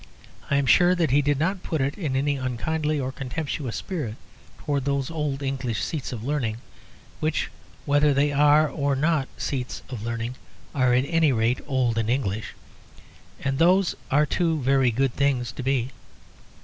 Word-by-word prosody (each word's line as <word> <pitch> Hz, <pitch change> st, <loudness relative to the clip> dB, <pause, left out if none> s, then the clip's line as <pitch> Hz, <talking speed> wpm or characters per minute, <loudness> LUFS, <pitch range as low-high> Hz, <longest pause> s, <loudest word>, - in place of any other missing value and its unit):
I 140 Hz, -, +2 dB
am 140 Hz, -1 st, +2 dB
sure 175 Hz, +8 st, +5 dB
that 165 Hz, -6 st, +1 dB
he 145 Hz, +2 st, +5 dB
did 145 Hz, 0 st, +1 dB
not 180 Hz, +6 st, 0 dB
put 160 Hz, -4 st, -2 dB
it 140 Hz, +2 st, 0 dB
in 150 Hz, -9 st, -2 dB
any 140 Hz, +2 st, +1 dB
unkindly 150 Hz, +4 st, -1 dB
or 130 Hz, -1 st, -2 dB
contemptuous 135 Hz, -1 st, -4 dB
spirit 150 Hz, -, -4 dB, 0.4 s
towards 140 Hz, -2 st, -2 dB
those 140 Hz, +1 st, 0 dB
old 150 Hz, -3 st, -2 dB
English 130 Hz, -5 st, -2 dB
seats 150 Hz, -6 st, -3 dB
of 115 Hz, -3 st, -6 dB
learning, 125 Hz, -5 st, -1 dB, 0.6 s
which 155 Hz, 0 st, -1 dB, 0.3 s
whether 145 Hz, +1 st, +4 dB
they 140 Hz, +1 st, +2 dB
are 150 Hz, +2 st, +5 dB
or 140 Hz, -2 st, -1 dB
are -, -, +1 dB
not 150 Hz, 0 st, +1 dB
seats 130 Hz, -3 st, -3 dB
of 125 Hz, -5 st, -6 dB
learning, 115 Hz, +2 st, -4 dB, 0.4 s
are, 130 Hz, -4 st, +3 dB
at 130 Hz, +2 st, +2 dB
any 165 Hz, -1 st, +3 dB
rate, 115 Hz, +1 st, +1 dB
old 125 Hz, -5 st, +1 dB
and 110 Hz, 0 st, -1 dB
English, 110 Hz, -4 st, -1 dB, 0.9 s
and 135 Hz, 0 st, -1 dB
those 180 Hz, +2 st, +4 dB, 0.2 s
are 145 Hz, +3 st, +4 dB
two 165 Hz, +1 st, 0 dB
very 135 Hz, -1 st, +4 dB
good 130 Hz, +2 st, 0 dB
things 130 Hz, -4 st, +1 dB
to 130 Hz, -, -7 dB
be. 130 Hz, -1 st, 0 dB
140 Hz, 175 wpm, -25 LUFS, 125-150 Hz, 0.9 s, sure